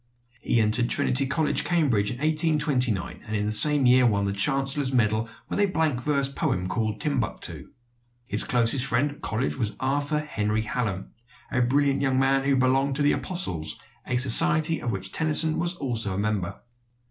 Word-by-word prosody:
He 120 Hz, -, 0 dB
entered 115 Hz, +2 st, +1 dB
Trinity 135 Hz, +2 st, +1 dB
College, 155 Hz, +3 st, -1 dB
Cambridge, 135 Hz, -13 st, 0 dB
in 125 Hz, -, -6 dB
1829, 150 Hz, -, 0 dB
and 110 Hz, -, -4 dB
in 105 Hz, 0 st, -1 dB
the 105 Hz, -, -2 dB
same 145 Hz, +5 st, +5 dB
year 125 Hz, 0 st, +4 dB
won 100 Hz, -3 st, 0 dB
the 100 Hz, -, -2 dB
chancellor's 135 Hz, +5 st, 0 dB
medal 115 Hz, -2 st, 0 dB, 0.2 s
with -, -, -4 dB
a 205 Hz, -, +3 dB
blank 160 Hz, -8 st, -1 dB
verse 140 Hz, 0 st, +1 dB
poem 90 Hz, -9 st, -3 dB
called 110 Hz, +2 st, -3 dB
"Timbuctoo." 135 Hz, -7 st, -3 dB, 0.6 s
His -, -, +2 dB
closest 125 Hz, +1 st, +1 dB
friend 135 Hz, +3 st, 0 dB
at 145 Hz, -, -15 dB
college 120 Hz, +5 st, -3 dB
was 110 Hz, -5 st, -3 dB
Arthur 145 Hz, +3 st, -1 dB
Henry 110 Hz, -7 st, -2 dB
Hallam, 105 Hz, -4 st, -4 dB, 0.4 s
a 125 Hz, -, 0 dB
brilliant 140 Hz, +3 st, +1 dB
young 135 Hz, -2 st, 0 dB
man 135 Hz, +1 st, +1 dB
who 140 Hz, 0 st, +2 dB
belonged 135 Hz, +2 st, +1 dB
to 145 Hz, -, -1 dB
The 145 Hz, -, +3 dB
Apostles, 85 Hz, -, -1 dB, 0.3 s
a 125 Hz, -, -2 dB
society 155 Hz, +6 st, +4 dB
of 120 Hz, -, -3 dB
which 95 Hz, -1 st, -6 dB
Tennyson 160 Hz, 0 st, +3 dB
was 175 Hz, +1 st, 0 dB
also 115 Hz, -, -2 dB
a -, -, -4 dB
member. 100 Hz, -2 st, -3 dB
130 Hz, 175 wpm, -24 LUFS, 110-145 Hz, 0.6 s, same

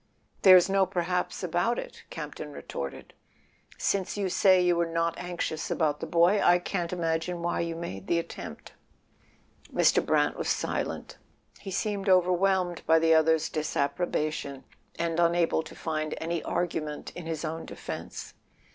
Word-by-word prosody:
"There's 185 Hz, -2 st, +8 dB
no 195 Hz, -1 st, +3 dB
perhaps 180 Hz, 0 st, -2 dB
about 180 Hz, +7 st, +1 dB
it," -, -, -7 dB
Campton 150 Hz, -1 st, -7 dB
retorted. 70 Hz, -, -7 dB, 0.6 s
"Since 195 Hz, 0 st, -1 dB
you 195 Hz, -2 st, 0 dB
say 185 Hz, 0 st, +5 dB
you 180 Hz, -1 st, +3 dB
were 170 Hz, 0 st, +1 dB
not 165 Hz, 0 st, 0 dB
anxious 175 Hz, -3 st, -3 dB
about 150 Hz, -3 st, 0 dB
the -, -, -5 dB
boy 175 Hz, +4 st, +4 dB
I 175 Hz, -, +6 dB
can't 175 Hz, -1 st, -3 dB
imagine 170 Hz, 0 st, -2 dB
why 175 Hz, -, 0 dB
you 170 Hz, -1 st, -2 dB
made 100 Hz, -, -6 dB
the 170 Hz, -, +2 dB
attempt." 170 Hz, -, -7 dB, 1.0 s
Mr. -, -, +4 dB
Brant -, -, +1 dB
was -, -, -2 dB
silent. -, -, -2 dB, 0.4 s
He 195 Hz, -, -8 dB
seemed 200 Hz, 0 st, -1 dB
overwhelmed 185 Hz, 0 st, +3 dB
by 160 Hz, -, +6 dB
the 165 Hz, 0 st, +4 dB
other's 160 Hz, 0 st, +4 dB
disapprobation, 150 Hz, -2 st, -2 dB, 0.3 s
and 165 Hz, 0 st, -1 dB
unable 170 Hz, -1 st, +3 dB
to -, -, -11 dB
find 155 Hz, -1 st, -3 dB
any 165 Hz, 0 st, -2 dB
argument 160 Hz, -4 st, -3 dB
in 175 Hz, -2 st, -7 dB
his 160 Hz, 0 st, -3 dB
own 160 Hz, +1 st, -5 dB
defence. -, -, -7 dB
170 Hz, 145 wpm, -28 LUFS, 160-180 Hz, 1.0 s, There's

